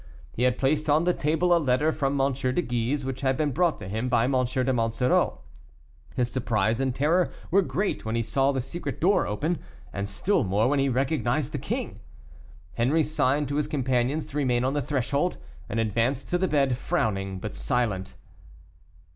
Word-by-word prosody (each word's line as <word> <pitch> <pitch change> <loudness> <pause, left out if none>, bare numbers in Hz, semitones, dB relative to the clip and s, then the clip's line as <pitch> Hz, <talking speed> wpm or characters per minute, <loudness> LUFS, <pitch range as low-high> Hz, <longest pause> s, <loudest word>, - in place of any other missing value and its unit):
He - - -5
had 125 0 +3
placed 150 +3 +1
on 150 +3 +4
the 180 +1 +2
table 170 +4 +2
a - - +3
letter 145 +3 +2
from 140 -2 -1
M. 135 0 +2
de 130 -1 -1
Guise, 125 +3 -1
which 135 0 -4
had 130 -1 +1
been 150 -2 +1
brought 170 +3 +1
to - - -8
him 110 +6 -2
by 120 -2 +3
M. 130 - +1
de 130 0 +1
Monsoreau. 115 - +1 0.7
His 125 -1 0
surprise 110 -2 0
and 130 -2 0
terror 165 +6 +2 0.2
were 195 +3 +5
great 180 +5 -2
when 110 +1 -2
he 115 - +1
saw 135 +4 +1
the 135 -2 -1
secret 145 +1 -5
door 195 +5 +3
open, 150 +11 -1 0.3
and 100 0 -3
still 155 - +1
more 105 +4 +1
when 145 +1 +2
he 135 0 +2
recognized 130 0 0
the - - -3
king. - - -4 0.8
Henri 140 +7 +2
signed 145 -1 +1
to 145 - -1
his 150 -1 0
companions 130 +1 0
to 145 - -7
remain 125 -4 +1
on 130 +2 0
the 145 - 0
threshold, 140 +5 -1 0.3
and 115 - -1
advanced 115 +5 0
to 175 - +1
the 190 - +1
bed, 135 -6 +2
frowning, 95 - -1
but 105 +3 -6
silent. 105 -6 -1
135 Hz, 190 wpm, -26 LUFS, 120-150 Hz, 0.8 s, were